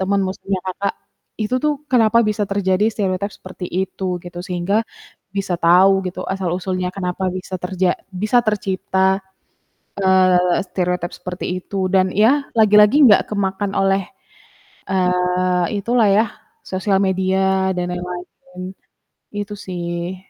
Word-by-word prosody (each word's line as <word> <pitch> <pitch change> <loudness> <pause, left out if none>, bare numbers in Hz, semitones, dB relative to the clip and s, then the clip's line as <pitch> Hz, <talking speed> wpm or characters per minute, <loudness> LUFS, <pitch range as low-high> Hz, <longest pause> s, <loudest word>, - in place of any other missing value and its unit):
teman 195 +1 +1
muslimnya 190 0 -3
Kakak 195 +2 -2 0.5
itu, 215 +3 -1
tuh, 300 -1 +3
kenapa 230 -2 +4
bisa 210 0 0
terjadi 200 0 0
stereotipe 200 -1 -2
seperti 185 0 -9 0.2
itu, 185 -2 -3
gitu, 175 0 -8
sehingga 190 +4 0 0.5
bisa 195 -2 -1
tahu 190 +3 +5
gitu 180 - -5
asal 190 -2 -2
usulnya 185 -1 -2
kenapa 180 0 -3
bisa 185 0 -7
terja 180 0 0 0.2
bisa 215 +6 +1
tercipta, 190 -2 0 0.8
eee, 185 -2 +3
stereotipe 180 -1 -2
seperti 180 0 -6 0.2
itu 190 0 -3
dan 185 -1 +4
ya 255 +9 +3
lagi-lagi 210 +3 +6
enggak 210 -5 +6
kemakan 200 -1 -1
oleh, 195 0 +2 0.9
eee, 180 -1 +1 0.2
itulah 235 0 +2
ya, 210 +3 +4 0.4
sosial 190 +1 0
media 190 0 +1
dan 180 0 -2
lain-lain, 180 +3 -8 0.6
itu, 205 0 -4
sih. 175 -1 -4
190 Hz, 125 wpm, -19 LUFS, 180-200 Hz, 0.9 s, lagi-lagi